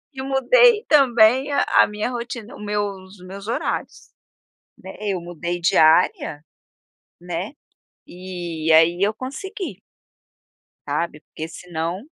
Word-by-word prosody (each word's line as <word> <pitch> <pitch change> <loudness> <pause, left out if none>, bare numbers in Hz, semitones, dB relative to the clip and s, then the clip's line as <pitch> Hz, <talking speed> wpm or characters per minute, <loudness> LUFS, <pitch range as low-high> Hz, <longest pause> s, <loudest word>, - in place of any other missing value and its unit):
E 265 - -5
mudei 425 - +4
também 260 -1 +4
a 280 - +2 0.2
a - - +4
minha 210 +3 -3
rotina, 235 -2 -6
o - - -13
meus 205 -2 -4
meus 195 +2 -9
horários. 235 - -4 0.7
Né, - - -10
eu 195 -4 -2
mudei 175 0 -5
de 170 - +1
área, 155 -2 +3 0.8
né, 175 +6 -5 0.5
e 175 -3 -4
aí 170 +3 +4
eu 210 +2 +3
consegui. 375 - -7 1.1
Sabe, 165 -3 -2
porque 160 - -8
senão 170 +3 -5
200 Hz, 120 wpm, -22 LUFS, 175-250 Hz, 1.1 s, mudei